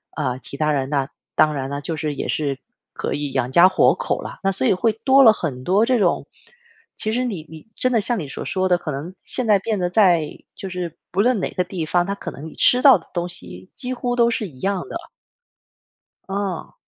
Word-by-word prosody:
呃， 125 0 -1
其 140 - -8
他 155 0 +1
人。 135 -2 -1
那 140 -2 0 0.3
当 155 -1 +4
然 135 -1 -3
了， 140 0 -3
就 160 +2 -2
是 150 0 -2
也 140 - -4
是 140 -3 -1 0.3
可 - - -3
以 145 -1 -3
养家糊口 170 - +3
了。 - - -8
那 195 - +2
所 130 -9 0
以 - - +5
会 220 +4 +1
多 270 0 +6
了 225 -4 +8
很 135 -11 -4
多 195 - +3
这 255 -1 +3
种 185 -6 +1 0.7
其 215 - -2
实 250 +3 0
你 195 -10 -4
你 160 +3 -12
真 255 - +1
的 235 - +3
像 230 +2 -1
你 155 - -5
所 135 - -6
说 185 0 0
的， 180 - +4
可 160 - -5
能 150 +7 -6
现 250 - -3
在 210 -2 +6
变 210 +1 -2
得 180 -1 0
在 175 -6 +4 0.3
就 195 - -6
是 180 -3 -5 0.2
不 190 - -3
论 240 +1 +3
哪 - - -1
个 180 - -1
地 180 -2 -5
方， 175 +3 +1
它 200 - -2
可 200 - -6
能 145 - -9
你 160 - -11
吃 250 - +4
到 275 -2 +9
的 - - -20
东 175 -1 -1
西 90 - -8
几 250 - -4
乎 245 0 -2
都 235 -1 +4
是 230 -2 -1
一 135 -7 -15
样 195 +1 -1
的。 - - -4 1.3
嗯。 195 -3 -3
180 Hz, 255 characters per minute, -21 LUFS, 150-215 Hz, 1.3 s, 到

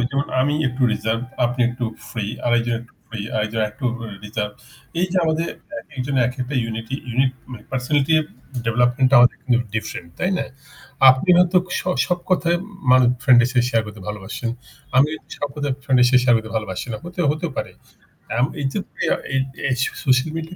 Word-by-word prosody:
অই 120 - +1
যেমন 140 0 0
আমি 145 +3 +2
একটু 125 +1 -4
রিজার্ভ 110 +1 -1 0.2
আপনি 120 +1 -1
একটু 120 0 -4 0.2
ফ্রি 110 -4 -3 0.2
আর 120 - +2
একজন 120 0 -1
একটু 120 +1 -16 0.2
ফ্রি 115 -2 -6 0.2
আরেকজন 110 +1 0
একটু 120 +5 -10 0.4
রিজার্ভড। 105 0 -3 0.5
এইযে 185 +1 0
আমাদের 160 +1 +1 0.4
একেকজনের 135 -2 -1
একেকটা 130 +2 -5
ইউনিটই 115 +3 -4
ইউনিট 130 +2 +2 0.4
পার্সোনালিটি 135 +3 +1 0.5
ডেভেলপমেন্টটা 125 +3 +3
আমাদের 125 - +5
কিন্তু 120 -2 +2 0.2
ডিফারেন্ট 110 -5 -4
তাই 180 - 0
না? - - -1 0.7
আপনি 130 +8 0
হয়তো 180 +1 +4 0.2
স - - -1 0.3
সব 180 - +1
কথায় 175 -1 +3 0.3
মানুষ 130 -1 +6
ফ্রেন্ড 125 -3 +7
এর - - +1
সাথে 125 -2 +2
শেয়ার 115 -2 +2
করতে 105 -1 -10
ভালোবাসেন। 105 +3 -4 0.5
আমি 140 +3 +6 0.3
সব 145 - -2
কথায় 145 -2 -1
ফ্রেন্ড 130 -2 +2
এর 125 - +7
সাথে 125 0 +5
শেয়ার 120 -1 +5
করতে 110 0 -4
ভালোবাসি 100 -4 -3
না। - - -3
হতে 175 +1 -6
হতেও 160 +3 -2
পারে। - - -3 0.7
আম 120 - +4 0.2
এইযে 135 +4 -1 0.3
ইয়া - - +2 0.2
এ - - +3 0.3
এ - - +1 0.4
সোশ্যাল 130 +3 +3
মিডিয়া 165 +2 -5
125 Hz, 175 wpm, -21 LUFS, 115-145 Hz, 0.7 s, ফ্রেন্ড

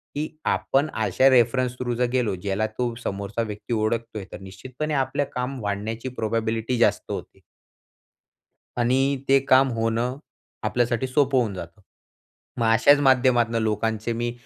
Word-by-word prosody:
की 150 +2 -1 0.2
आपण 140 +3 +1
अशा 135 +1 +3
रेफरन्स 125 0 +3
थ्रू 120 -1 -2
जर 125 +1 +1
गेलो 120 -6 +1
ज्याला 100 +3 -2
तो 120 +2 -3
समोरचा 100 +3 -3
व्यक्ती 110 +2 -5
ओळखतोय 110 -1 -2
तर - - -8
निश्चितपणे 130 +11 -6
आपलं 135 +1 0
काम 125 +2 -3
वाढण्याची 105 +4 -3
प्रोबॅबिलिटी 115 +2 -1
जास्त 120 - +1
होते. - - -7 1.4
आणि 135 +3 +1
ते 135 - +6
काम 130 +1 +6
होणं 115 +3 -1 0.5
आपल्यासाठी 120 +1 0
सोपं 135 0 +2
होऊन 110 -5 -1
जातं. 90 +2 -9 0.8
मग 120 - +1
अशाच 145 +5 +5
माध्यमातनं 125 -4 +3
लोकांचे 110 +1 -1
मी, 120 +1 -2
120 Hz, 135 wpm, -24 LUFS, 110-130 Hz, 1.4 s, ते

